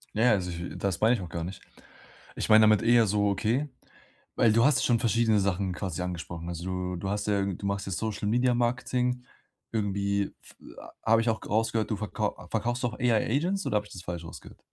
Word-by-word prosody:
Ja, 110 - +2
ja, 125 - +6
also, 90 -3 -1
ich 85 +1 -6
das 95 -3 -2
meine 115 +3 +5
ich 105 - -5
auch 90 - -7
gar 85 0 -4
nicht. 95 +3 -6 0.8
Ich - - -3
meine 110 0 +8
damit 110 -1 +5
eher 115 0 +5
so, 100 0 +2
okay 120 +9 0 0.7
weil 115 - +5
du 115 +2 +4
hast 145 -2 +3
schon 120 -2 +3
verschiedene 115 -2 +2
Sachen 95 -1 0
quasi 90 -1 -4
angesprochen. 85 -1 -5
Also, 85 +1 -5
du 90 0 -3
du 95 +3 -4
hast 105 +1 -2
ja 100 -2 +2
du 100 0 -4
machst 100 0 -2
ja - - -3
Social-Media-Marketing. 120 +4 0 0.5
Irgendwie 100 -2 -1
f - - -18 0.2
a - - -12 0.2
habe 115 - +5
ich 115 - 0
auch 110 - 0
g - - -10
rausgehört, 110 +1 0
du - - +1
verkauf 105 0 -2 0.2
verkaufst 120 +3 -1
auch 115 -3 -2
AI-Agents 140 - +1
oder - - -1
habe 105 - -2
ich - - -13
das 90 - -8
falsch 85 -1 -5
rausgehört? 80 - -11
105 Hz, 210 wpm, -28 LUFS, 95-115 Hz, 0.8 s, meine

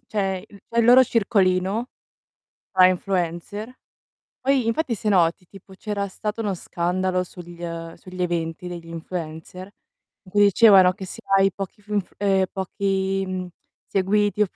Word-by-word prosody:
c'è 195 -3 -2
il 200 -1 -17
c'è 235 - -2
il 230 - +5
loro 250 +2 +8
circolino 200 0 +1 0.8
tra 185 0 +6
influencer. 185 +4 -2 0.7
Poi 265 -2 +2
infatti 230 +1 0
se 210 +1 -2
noti, 180 -1 +2
tipo 195 +1 -15
c'era 200 +1 -3
stato 210 +3 -4
uno 205 -3 -1
scandalo 180 +2 -1
sugl 175 -1 -12
ehm, 165 -1 -5
sugli 185 0 -9
eventi 170 0 -2
degli 170 -1 -7
influencer 165 +2 -7 0.5
in 185 - -17
cui 205 0 +4
dicevano 195 -3 +7
che 190 0 -8
se - - -9 0.2
hai 195 0 +4
pochi 200 +2 -7
funf 205 -2 -3
ehm, 195 -2 +2
pochi, 195 0 -1
mhmm, 185 -1 -4 0.4
seguiti 205 +2 +1
e 205 - +3
190 Hz, 150 wpm, -23 LUFS, 180-205 Hz, 0.8 s, loro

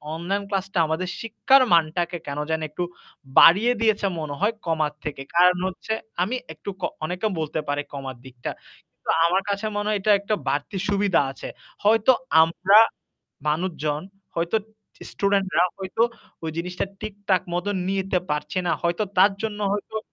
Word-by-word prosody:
Online 195 +5 -2
ক্লাসটা 195 -2 -1
আমাদের 170 +4 -2
শিক্ষার 260 +4 +4
মানটাকে 170 +2 +2
কেন 140 +1 -3
জানি 160 0 -1
একটু 175 +4 -3 0.6
বাড়িয়ে 215 +9 +7
দিয়েছে 215 -2 +2
মনে 145 -2 -4
হয় 210 +3 +2
কমার 155 -2 0
থেকে। 140 -3 -4
কারণ 180 +1 +6
হচ্ছে 190 +4 -4 0.3
আমি 235 +7 -1 0.2
একটু 155 +6 -8
ক - - -10 0.2
অনেকে 180 +6 -1
বলতে 155 0 -2
পারে 145 0 0
কমার 135 -2 -6
দিকটা। 125 -1 -6 0.4
কিন্তু - - -14 0.2
আমার 185 +3 +3
কাছে 200 +2 -1
মনে 205 0 -1
হয় 210 - +2
এটা 210 - +3
একটা 210 +1 -1
বাড়তি 145 +7 -2
সুবিধা 200 -5 +3
আছে। - - -8 0.4
হয়তো 220 +4 +5 0.3
আমরা 175 +5 +4 0.7
মানুষজন 155 -2 -1 0.3
হয়তো 170 +6 +1 0.5
স্টুডেন্টরা 195 -4 +2
হয়তো 190 +3 -3 0.4
ওই 160 - -2
জিনিসটা 180 +3 -2 0.2
ঠিক-ঠাক 200 -3 0
মত 175 +2 -1 0.2
নিতে 195 -1 0
পারছে 150 +5 -1
না। - - +2
হয়তো 170 +5 +1
তার 200 +2 +7
জন্য 210 -1 -3
হইলেও 210 +2 -3
185 Hz, 150 wpm, -24 LUFS, 160-205 Hz, 0.7 s, বাড়িয়ে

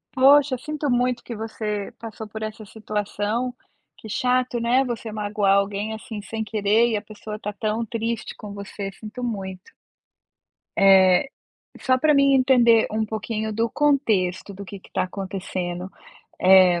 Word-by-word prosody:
Poxa, 270 0 +5
sinto 300 0 -3
muito 245 0 +1
que 235 - -6
você 210 -2 -4
passou 220 -1 -8
por 220 +1 -7
essa 215 0 -6
situação. 210 +3 -3 0.4
Que - - -11
chato, 250 +2 +1
né, 240 +3 +3
você 235 -2 -4
magoar 205 -2 +1
alguém, 200 +2 0
assim, 220 -1 -7
sem 220 +2 -4
querer 215 +2 +2
e 220 - 0
a - - -4
pessoa 215 0 -8
tá 210 - -4
tão 215 +2 -2
triste 230 +1 -3
com 205 -1 -9
você, 200 0 -6
sinto 220 +5 -9
muito. 195 -5 -5 1.0
Eh, 190 +3 +6 0.5
só 255 -1 +3
para 300 +3 +3
mim 275 -1 +5
entender 245 -4 +5
um 220 +1 0
pouquinho 220 0 -3
do 225 +2 0
contexto, 220 -11 +1
do 200 +1 -8
que 200 0 -9
que - - -20
tá - - 0
acontecendo, 185 -1 -4 0.5
eh, 185 -2 +6
215 Hz, 155 wpm, -23 LUFS, 200-240 Hz, 1.0 s, Eh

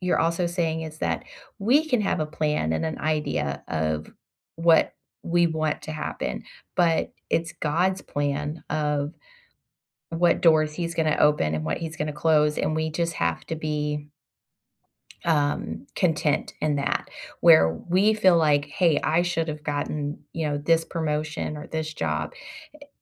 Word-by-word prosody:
you're 180 -1 +1
also 170 +2 +1
saying 165 -2 -1
is 155 -1 -8
that - - -1 0.3
we 260 +10 +3
can 250 -6 +2
have 195 -4 0
a 155 - 0
plan 150 - -1
and 80 - -1
an 160 -1 -3
idea 150 - -1
of 80 -1 -2 0.5
what 165 -1 +4 0.3
we 175 0 +3
want 155 -2 -1
to 155 - -6
happen, 155 - -4 0.3
but 170 -2 +2 0.2
it's 165 0 0
God's 180 +5 0
plan 145 +2 -2
of 150 0 -1 1.0
what 170 +1 +2
doors 155 -2 +4
he's 170 0 -3
gonna 155 -2 +1
open 150 - +3
and 80 0 -2
what 80 0 -1
he's 160 -1 -5
gonna 150 0 -2
close, 150 -1 +3
and 155 +1 0
we 160 0 0
just 170 +2 -1
have 85 -1 -1
to 160 - -3
be 150 -1 -2 1.2
um, 155 - 0
content 160 -5 +1
in 150 -1 +1
that, 140 - -1 0.3
where 160 - +7 0.2
we 195 +5 +4
feel 190 -5 +5
like, 150 -3 +3
"Hey, 165 +1 +2
I 165 +2 +2
should've 165 -4 -2
gotten, 145 0 -2
you 160 -2 -2
know, 145 0 -1
this 165 +2 +2
promotion 155 -1 -2
or 150 - -8
this 160 -1 -3
job," - - -2 0.4
eh, 290 -1 -14
155 Hz, 155 wpm, -25 LUFS, 150-170 Hz, 1.2 s, where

